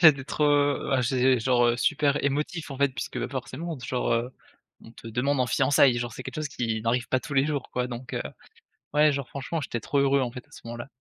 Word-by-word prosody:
j'étais 150 -6 +7
trop, 150 - -1 0.5
ah, 130 -1 +3
j'ai 130 +1 +3
genre, 120 0 +3
heu, 120 0 +2
super 145 +1 +1
émotif, 150 +3 -2
en 135 - -6
fait, 140 - +4
puisque 130 - -4
forcément, 140 +4 -5
genre, 125 -1 -1
heu, 120 +2 -1 0.5
on 115 - -13
te 115 - -11
demande 130 +4 0
en 125 - +2
fiançailles! 135 -1 +4
Genre, 120 -2 -4
c'est - - -8
quelque - - -7
chose 155 -1 -2
qui 115 -5 -2
n'arrive 120 +2 0
pas 130 - +1
tous 145 -1 -7
les 135 - +4
jours, 145 -3 -3
quoi, 125 0 -1
donc 125 +1 -7
heu - - -1 0.7
ouais, 150 0 +5
genre, 140 -2 -3
franchement, 140 +4 -4
j'étais 120 -3 -3
trop 140 - -2
heureux, 140 0 +3
en 120 -2 -1
fait, 125 -1 -9
à - - -31
ce - - -13
moment-là. 120 +2 -6
130 Hz, 235 wpm, -26 LUFS, 120-140 Hz, 0.7 s, j'étais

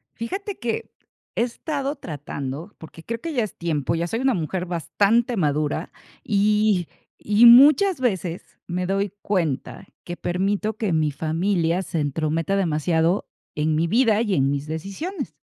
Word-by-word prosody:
Fíjate 385 - -5
que 235 -2 -3 0.4
he - - +2
estado 280 +3 -3
tratando, 145 - -6
porque 160 0 -12
creo 230 +3 -5
que 330 - -4
ya 245 -5 +1
es 215 - -6
tiempo, 165 -2 -1
ya 170 +1 -1
soy 225 +6 -2
una 265 -1 +3
mujer 180 +1 -2
bastante 205 - +1
madura, 150 -3 0 0.3
y 210 -3 +2 0.3
y 210 +3 +5
muchas 290 +9 +7
veces 190 -8 -1 0.2
me 180 +1 -2
doy 195 +1 -1
cuenta 180 -1 -2 0.2
que 175 - -6
permito 200 +4 -1
que 215 -7 -1
mi 155 -1 +2
familia 165 +3 0
se 170 -3 -3
entrometa 155 +4 -1
demasiado 165 0 +1 0.3
en 155 +1 0
mi 160 +2 +1
vida 225 +2 +3
y 210 -5 0
en 135 0 +2
mis 140 +1 -3
decisiones. 195 - -5
185 Hz, 150 wpm, -23 LUFS, 160-225 Hz, 0.4 s, muchas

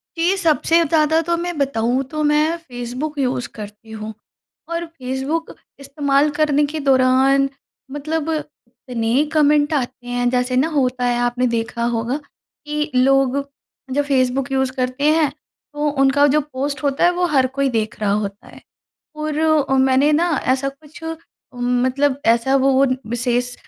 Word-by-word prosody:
कि 345 +4 +2
सबसे 330 0 +3
ज़्यादा 315 +1 +2
तो 340 - +2
मैं 350 -2 -4
बताऊँ 260 -2 0
तो 305 0 -2
मैं 305 +3 +2
फ़ेसबुक 260 +1 -6
यूज़ 250 -2 -1
करती 210 +1 -10
हूँ। 220 0 -6 0.6
और 340 0 -2
फ़ेसबुक 280 +2 -4 0.3
इस्तेमाल 280 +1 +1
करने 295 -1 +3
के 305 +2 -5
दौरान 270 0 +3 0.4
मतलब 310 +2 -3 0.4
इतने 245 +1 -1
कमेंट 295 0 +3
आते 250 -2 -3
हैं 245 0 0
जैसे 250 0 0
न 270 - +3
होता 250 -3 0
है 240 0 +1
आपने 245 +1 +1
देखा 235 0 -2
होगा, 240 +3 -1 0.5
कि 300 0 -2
लोग 270 +1 +3 0.5
जब 290 +2 +1
फ़ेसबुक 270 0 0
यूज़ 265 -1 +1
करते 255 +4 0
हैं 315 -2 +2 0.4
तो 295 0 0
उनका 275 +2 +4
जो 300 +2 +3
पोस्ट 280 0 -4
होता 280 +2 0
है 350 - +5
वो 355 0 0
हर 260 -1 +4
कोई 275 -1 +1
देख 220 -3 -2
रहा 200 -1 +1
होता 205 -1 -3
है। - - -14 0.6
और 305 0 -3 0.3
अ, 270 - +3
मैंने 265 +3 +3
न 305 - +3 0.3
ऐसा 270 +1 -1
कुछ 295 +3 -13 0.5
मतलब 255 +3 0
ऐसा 235 +4 +3
वो 270 0 +3
वो 270 +1 +4 0.3
विशेष 245 0 -1
270 Hz, 155 wpm, -20 LUFS, 250-300 Hz, 0.6 s, है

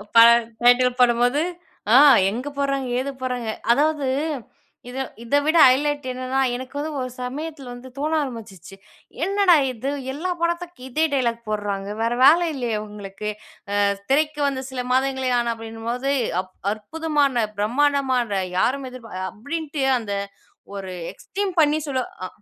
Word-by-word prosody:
ப - - +6 0.4
டைட்டில் 245 +1 +4
போடும்போது, 245 +3 +3 0.5
ஆ - - +8 0.3
எங்க 245 +7 -4
போட்றாங்க, 275 -2 0
ஏது 280 +2 -2
போட்றாங்க. 250 -3 -3 0.2
அதாவது 295 +1 +2 0.8
இத 250 - -8 0.3
இத 235 +5 0
விட 320 +2 +3
ஹைலைட் 285 +2 +1
என்னன்னா, 255 +1 -1
எனக்கு 260 +3 -7
வந்து 310 +2 -3
ஒரு 255 0 -3
சமயத்தில 280 0 -6
வந்து 250 +1 -10
தோண 300 +3 -1
ஆரம்பிச்சிச்சு. 210 - -9 0.5
என்னடா! 395 -2 +4 0.2
இது 255 +3 -4 0.2
எல்லா 360 +6 -3
படத்துக்கு 345 -3 -2
இதே 315 +5 +1
டயலாக் 235 -3 0
போட்றாங்க. 205 -2 -2
வேற 230 +1 +1
வேல 310 +5 +8
இல்லயா 240 -6 -2
இவங்களுக்கு? 210 0 -7 0.5
அ - - +4 0.3
திரைக்கு 300 +1 +2
வந்த 265 -1 -2
சில 255 -2 -4
மாதங்களே 265 -1 +1
ஆன 235 -1 0
அப்பிடின்னும்போது 230 +4 -4 0.3
அப் 185 0 -17 0.2
அற்புதமான, 280 +1 0
பிரமாண்டமான, 255 -3 +1 0.2
யாரும் 265 +5 +1
எதிர்பா 245 -3 -11 0.2
அப்பிடின்ட்டு 290 +4 -4 0.2
அந்த 205 -3 -5 0.6
ஒரு 190 -1 -6 0.2
எக்ஸ்ட்ரீம் 390 -1 -4
பண்ணி 305 +1 +3
சொல்லு 260 -2 -1 0.2
அ - - -4
260 Hz, 135 wpm, -23 LUFS, 230-290 Hz, 0.8 s, ஆ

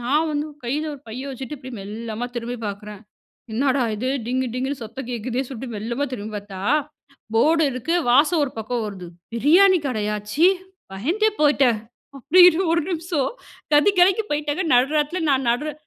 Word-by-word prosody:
நான் 290 +7 +1
வந்து 295 0 -2 0.2
கையில 295 +6 -2
ஒரு 280 - -13
பைய 255 +5 -6
வச்சுட்டு 265 +2 -6
இப்டி 260 -1 -10
மெல்லமா 220 +3 -5
திரும்பி 240 +1 -4 0.7
பார்க்கிறேன்."என்னடா 255 +3 -1
இது! 250 +5 -2 0.2
டிங்கு 255 +2 -1
டிங்குன்னு 260 +2 -3
சத்தம் 235 +3 -8
கேட்குதேன்னு!" 245 +3 -3
சொல்லிட்டு 245 -2 -7
மெல்லமா 235 +7 -2
திரும்பி 215 -2 -6
பார்த்தா, 200 -2 -8 0.7
போர்டு 320 +7 +4
இருக்கு 255 +6 -2 0.2
வாசம் 295 +6 +4
ஒரு 275 - -3
பக்கம் 225 +2 -2
வருது 190 -4 -7 0.3
பிரியாணி 355 +10 +5
கடையா? 210 -5 -1 0.2
ச்சீ, 325 +8 +5 0.5
பயந்தே 340 - +1
போயிட்டேன் 275 -6 +4 0.4
அப்படின்னு 350 +5 +6
ஒரு 335 - +2
நிமிஷம் 330 -5 -1 0.4
கதி 295 +8 +5
கலங்கிபோய்ட்டங்க. 355 -4 +2
நடுராத்திரில 295 +7 +2
நான் 265 -2 +1
நடுரா 295 +5 -1
265 Hz, 145 wpm, -22 LUFS, 235-305 Hz, 0.7 s, அப்படின்னு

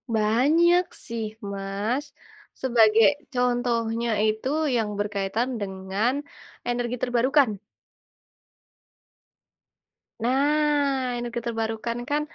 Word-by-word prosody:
Banyak 300 +12 +4 0.2
sih 230 -1 -3 0.3
Mas. 200 +8 -2 0.6
Sebagai 225 -3 +5 0.3
contohnya 235 -2 0 0.2
itu 220 +4 -1 0.3
yang 220 -3 0
berkaitan 205 +4 -1
dengan 190 +5 -1 0.6
energi 240 0 -1
terbarukan. 245 -3 +2 2.6
Nah, 280 -1 +2
energi 240 0 -3
terbarukan 225 0 -2
kan, 295 +1 +1
235 Hz, 75 wpm, -25 LUFS, 220-260 Hz, 2.6 s, Sebagai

